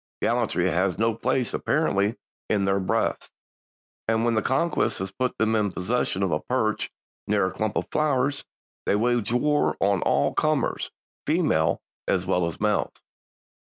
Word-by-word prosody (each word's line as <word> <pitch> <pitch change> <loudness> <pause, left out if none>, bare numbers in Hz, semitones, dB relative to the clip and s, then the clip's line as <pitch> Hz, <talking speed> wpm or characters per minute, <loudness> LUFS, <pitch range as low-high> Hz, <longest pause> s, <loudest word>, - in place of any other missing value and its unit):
Gallantry - - +1
has 90 +1 +1
no 115 +2 +2
place 115 +2 -1
apparently 100 +4 +1 0.3
in 100 -2 +2
their 100 0 +2
breasts, 95 - -1 0.8
and 115 +1 +2
when 115 -2 +2
conquest 160 +9 +1
has 95 0 -4
put 125 +5 -2
them 110 0 +2
in 105 -2 +1
possession 95 0 -1
of 95 - 0
a 75 - +1
perch 110 -1 -1 0.4
near 100 -2 +2
a 95 - -1
clump 110 -1 -2
of - - -1
flowers 140 -2 +1 0.4
they - - +3
wage 120 +1 +1
war 145 +5 +2
on 100 -2 +2
all 70 - +2
comers, - - 0 0.4
females 150 - +2 0.3
as 95 -1 +1
well 90 -2 +1
as 85 - -6
males." 105 -1 -1
110 Hz, 155 wpm, -25 LUFS, 95-125 Hz, 0.8 s, they